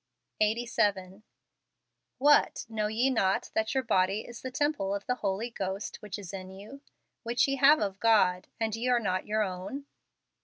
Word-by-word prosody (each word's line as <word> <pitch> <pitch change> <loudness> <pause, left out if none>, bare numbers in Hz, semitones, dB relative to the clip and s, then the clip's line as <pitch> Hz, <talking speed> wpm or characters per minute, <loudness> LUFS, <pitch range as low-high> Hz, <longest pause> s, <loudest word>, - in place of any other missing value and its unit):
Eighty 220 +3 +1
Seven. 200 -4 -1 1.0
"What, 290 0 +3
know 215 -2 -2
ye 235 +5 +1
not 195 -6 0
that 220 +4 -1
your 265 - +1
body 195 -2 +1
is 240 +1 -11
the 260 - -5
temple 255 -8 -1
of 200 - -6
the 250 - +1
Holy 205 +4 -2
Ghost 195 -1 -4
which 210 -2 -7
is 200 -2 -9
in 185 -1 -7
you, 205 +9 -11 0.4
which 235 +3 +1
ye 275 0 -1
have 285 +3 +6
of 195 -1 -2
God, 190 -5 +3
and 220 -1 -1
ye 235 +2 -3
are 245 -1 +3
not 185 -4 -2
your 215 +1 +1
own?" 195 +9 -5
215 Hz, 180 wpm, -29 LUFS, 195-240 Hz, 1.0 s, have